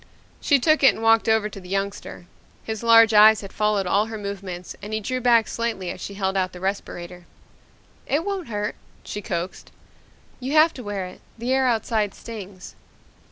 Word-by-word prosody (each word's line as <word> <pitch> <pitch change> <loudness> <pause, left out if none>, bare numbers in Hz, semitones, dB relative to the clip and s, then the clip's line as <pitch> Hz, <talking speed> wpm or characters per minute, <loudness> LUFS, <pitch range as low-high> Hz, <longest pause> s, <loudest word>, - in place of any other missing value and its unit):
She 285 - +3
took 310 +4 +2
it 270 - +6
and 225 - -7
walked 225 0 +4
over 220 -1 +3
to 200 - -9
the 180 -1 -13
youngster. 195 -2 -4 0.4
His 220 -1 -5
large 230 -1 +6
eyes 215 +1 +7
had 195 - -10
followed 210 -2 +1
all 200 +4 +2
her 225 -1 -6
movements 195 -3 -6
and 210 +1 -7
he 215 - 0
drew 255 +4 -3
back 235 -2 +4
slightly 225 -6 -3
as - - -9
she 200 - -6
held 190 -1 -1
out 185 -1 0
the 180 - -9
respirator. 180 -2 -5 0.8
"It 300 +4 0
won't 395 -3 -3
hurt," 210 -1 -3 0.3
she 210 - -6
coaxed. 175 -1 -5 0.7
"You 260 +3 -4
have 315 +1 +5
to 250 - -9
wear 205 -3 -4
it. 180 - -11 0.2
The 240 +3 -1
air 265 -1 +2
outside 220 -3 0
stings." 200 -5 -9
210 Hz, 190 wpm, -23 LUFS, 195-230 Hz, 0.8 s, eyes